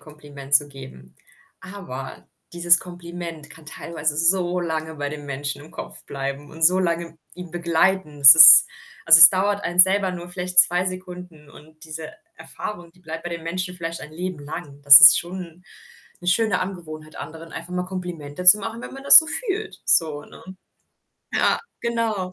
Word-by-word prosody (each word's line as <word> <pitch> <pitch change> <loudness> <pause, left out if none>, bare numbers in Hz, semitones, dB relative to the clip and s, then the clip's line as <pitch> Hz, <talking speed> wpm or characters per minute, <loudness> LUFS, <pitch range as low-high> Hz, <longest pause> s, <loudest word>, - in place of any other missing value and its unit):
Kompliment 145 -2 -8
zu 145 0 +3
geben. 130 - -15 0.5
Aber 170 -10 -11 0.3
dieses 175 0 +3
Kompliment 170 -3 -11
kann 160 -1 -17
teilweise 155 -1 -6
so 175 +2 0
lange 160 -2 -6
bei 145 -1 -6
dem 145 -1 -10
Menschen 140 +1 -6
im 155 - -17
Kopf - - -12
bleiben 140 +1 -8
und 160 +1 -12
so 180 +3 +3
lange 170 -2 -4 0.2
ihn 180 -1 -12
begleiten. 170 -2 -2
Es 135 -1 +10
ist 160 0 +8 0.4
also, 165 0 +6
es 165 - +10
dauert 200 +2 -2
einem 175 +1 -6
selber 190 +1 +4
nur 175 -1 -10
vielleicht 180 0 -6
2 180 +1 -1
Sekunden 180 -4 -10
und 155 +2 -19
diese 160 0 -10 0.2
Erfahrung, 175 -5 -10
die 180 - -29
bleibt 165 -1 -9
bei 175 - -7
den 170 -1 -8
Menschen 180 +2 -6
vielleicht 165 -1 -8
ein 150 - -13
Leben 180 0 -7
lang. 145 -1 -11
Das 140 0 +9
ist 150 -2 +8
schon 175 -1 -10 0.6
'ne 175 - -6
schöne 200 0 -1
Angewohnheit, 155 -5 -9
anderen 165 +1 -12
einfach 170 +2 -10
mal 180 0 -4
Komplimente 180 -4 -9
zu 185 +4 +7
machen, 225 +3 -8
wenn - - -11
man 270 0 -13
das - - +9
so 320 - +1 0.2
fühlt 425 +2 -6
so, 150 -3 0
ne? - - -17 0.9
Ja, - - 0 0.2
genau. 225 -6 -4
170 Hz, 175 wpm, -20 LUFS, 155-180 Hz, 0.9 s, Es